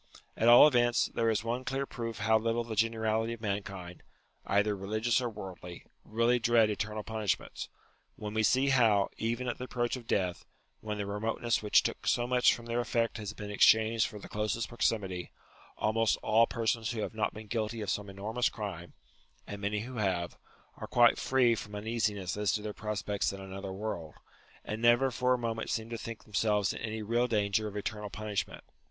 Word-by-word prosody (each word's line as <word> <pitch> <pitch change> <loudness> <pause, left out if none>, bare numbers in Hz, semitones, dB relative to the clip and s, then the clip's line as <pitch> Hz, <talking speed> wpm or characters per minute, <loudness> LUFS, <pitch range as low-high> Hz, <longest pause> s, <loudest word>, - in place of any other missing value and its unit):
At 115 - +1
all 120 +5 +10
events, 120 -4 +2
there 115 -1 +1
is 110 -1 0
one 120 +2 -2
clear 135 +1 -2
proof 115 -4 -5
how 110 +1 +3
little 115 +1 0
the 115 -1 -6
generality 110 +1 +1
of 115 - -10
mankind, 100 -4 -4 0.5
either 105 +1 +2
religious 110 +5 0
or 120 - -1
worldly, 90 -4 -9 0.2
really 115 +3 +2
dread 115 -2 +4
eternal 105 +1 -3
punishments, 110 -2 -3 0.5
when 105 0 -6
we 110 - +1
see 130 +5 +3
how, 110 -7 +4
even 120 +3 -1
at 120 - -3
the 125 - -4
approach 120 -1 -1
of 120 -3 -10
death, 90 -3 0 0.4
when 105 -1 -4
the 100 - -2
re 100 +1 -4
moteness 115 +2 0
which 105 -1 +4
took - - -4
so 120 - +2
much 125 0 +4
from 120 - -11
their 120 +1 -1
effect 115 0 0
has 105 -1 -5
been 105 -1 -7
exchanged 110 +2 +4
for 105 - -9
the 100 - -10
closest 105 +2 -2
proximity, 95 -7 -1 0.5
almost 110 +1 +2
all 115 +2 +4
persons 115 -2 -1
who 110 0 -3
have - - -4
not 110 -1 0
been 110 +1 -8
guilty 110 +1 -2
of 105 - -3
some 105 0 -3
enormous 110 +5 -1
crime 90 -5 -6 0.5
(and 100 0 -7
many 105 +1 -1
who 125 +2 -7
have) 90 -5 -1 0.4
are - - -7
quite 120 -1 +5
free 130 -3 +3
from 105 -1 -6
un 105 +1 -6
easiness 105 -5 -1
as 105 -1 +1
to 105 - -2
their 105 -1 -4
prospects 105 -1 -2
in 100 - -8
another 95 0 -7
world, 95 -6 -5 0.5
and 110 +1 -4
never 120 +3 +4
for 125 +1 +2
a - - -2
moment 115 -2 -3
seem 115 +1 -3
to 115 - -3
think 115 -1 -7
themselves 105 -1 +1
in - - -7
any 110 -1 -4
real 120 +3 +1
danger 105 -1 +1
of 105 0 -6
eternal 105 0 -4
punishment. 105 -1 -4
110 Hz, 195 wpm, -31 LUFS, 105-115 Hz, 0.5 s, all